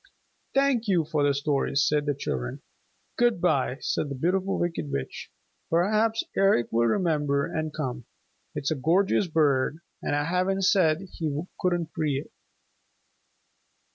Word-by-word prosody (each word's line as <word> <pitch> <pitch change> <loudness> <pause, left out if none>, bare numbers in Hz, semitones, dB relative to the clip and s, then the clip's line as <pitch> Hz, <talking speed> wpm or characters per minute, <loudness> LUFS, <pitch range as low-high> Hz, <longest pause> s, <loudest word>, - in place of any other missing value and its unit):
"Thank 270 -4 +2
you 175 -5 +2
for 155 -1 -1
the 145 0 +4
stories," 140 -1 +1
said 150 -1 +1
the 145 - +1
children. 65 - -4 0.6
"Good 240 -5 +3
by," 140 -7 +1
said 150 - -1
the 140 - -4
Beautiful 185 +7 0
Wicked 165 - -2
Witch. 70 -1 -4 0.4
"Perhaps 215 +6 +2
Eric 195 -12 +3
will 115 +1 +2
remember 145 - +1
and 155 -1 -3
come. 130 -6 -4 0.5
It's 140 - -2
a - - +1
gorgeous 180 +7 +2
bird, 150 -3 +2 0.2
and - - -1
I 145 - +1
haven't 185 +4 0
said 175 -4 +3
he 155 -2 -2 0.2
couldn't 175 -3 0
free 150 -3 0
it." - - -11
155 Hz, 140 wpm, -26 LUFS, 140-185 Hz, 0.6 s, the